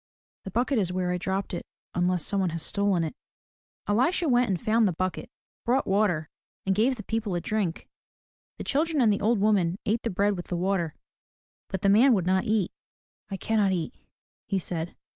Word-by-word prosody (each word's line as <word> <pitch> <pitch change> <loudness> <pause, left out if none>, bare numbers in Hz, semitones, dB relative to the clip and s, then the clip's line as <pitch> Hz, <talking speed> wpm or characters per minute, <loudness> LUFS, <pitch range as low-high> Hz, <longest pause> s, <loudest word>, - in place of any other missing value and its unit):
The - - -4
bucket 240 +5 +1
is 185 -3 0
where 180 -1 -1
I 180 - -1
dropped 190 +2 -2
it 175 - -5 0.3
unless 180 -1 +1
some 200 -1 0
one 185 -2 +1
has 165 -1 -4
stolen 200 -4 +1
it." 160 - -3 0.7
Elisha 260 - +2
went 245 -3 +3
and 185 -3 0
found 225 -1 +3
the 185 - 0
bucket, 185 +2 -3 0.3
brought 255 +3 +2
water, 190 -6 +1 0.4
and 195 - +2
gave 230 +7 +2
the 215 - -8
people 220 -3 -2
a - - +1
drink. 190 -2 -2 0.7
The - - -5
children 310 +2 +1
and 225 -5 +5
the 200 - -2
old 220 +1 +2
woman 195 -4 +2
ate 225 +3 +1
the 230 - -2
bread 200 +1 +1
with 175 - -7
the 175 - -2
water, 175 -3 0 0.7
but 190 -1 -4
the - - +4
man 235 +5 +6
would 185 -4 0
not 190 +1 +2
eat. 210 -4 +1 0.6
"I 195 - -4
cannot 205 -1 +1
eat," 175 +5 -2 0.5
he 195 - 0
said. 170 -2 -4
195 Hz, 200 wpm, -27 LUFS, 180-220 Hz, 0.7 s, man